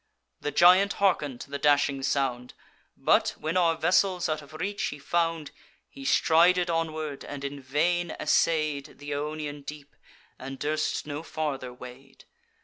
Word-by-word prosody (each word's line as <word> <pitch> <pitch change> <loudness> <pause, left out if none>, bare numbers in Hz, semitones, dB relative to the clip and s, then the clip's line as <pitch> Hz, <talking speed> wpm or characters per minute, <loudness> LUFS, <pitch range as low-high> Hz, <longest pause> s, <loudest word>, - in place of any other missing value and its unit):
The 145 - -3
giant 185 +6 +6
harken'd 150 -10 +1
to 140 - -10
the 140 - -3
dashing 140 -1 +2
sound: 130 -2 -1 0.4
But, - - +2
when 155 +3 -3
our 170 -3 +3
vessels 180 +1 +2
out 155 -1 -2
of 145 +1 -15
reach 200 +5 -2
he 145 - -4
found, 165 +1 -1 0.4
He 135 - -11
strided 175 +4 +4
onward, 155 -3 -3
and 145 -1 -7
in 140 0 -5
vain 170 +6 0
essay'd 155 -2 +1
Th' 145 0 -7
Ionian 150 0 -4
deep, 145 0 -10 0.4
and 135 +1 -7
durst 155 +2 -1
no 145 0 -5
farther 145 -6 -4
wade. 125 +2 -13
150 Hz, 145 wpm, -27 LUFS, 140-165 Hz, 0.4 s, giant